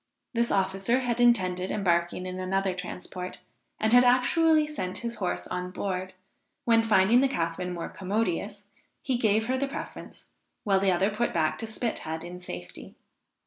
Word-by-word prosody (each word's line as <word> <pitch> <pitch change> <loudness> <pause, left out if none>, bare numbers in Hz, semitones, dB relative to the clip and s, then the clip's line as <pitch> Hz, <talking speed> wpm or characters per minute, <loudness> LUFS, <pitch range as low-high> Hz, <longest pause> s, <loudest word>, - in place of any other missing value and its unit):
This 235 0 +1
officer 195 +6 +1
had 245 -1 -1
intended 185 -6 +3
embarking 175 -2 0
in 185 0 -5
another 190 +1 0
transport, 180 0 -7 0.4
and 220 +1 +2
had 245 0 +8
actually 305 +6 +4
sent 240 -12 -4
his 235 -1 -4
horse 180 -3 -2
on 180 0 -4
board, 185 0 -4 0.5
when 230 -1 +5
finding 220 +2 +5
the 275 - +4
Catharine 180 -5 -2
more 170 -1 -4
commodious, 200 0 -2 0.4
he 260 - 0
gave 220 -2 +2
her 260 +2 0
the 275 - 0
preference, 275 - -8 0.4
while 195 -3 +3
the 195 0 +3
other 190 +4 +2
put 225 0 -1
back 155 -1 +1
to 225 - -4
Spithead 215 -8 -3
in 175 +1 -8
safety. 90 - -9
195 Hz, 160 wpm, -27 LUFS, 180-235 Hz, 0.5 s, had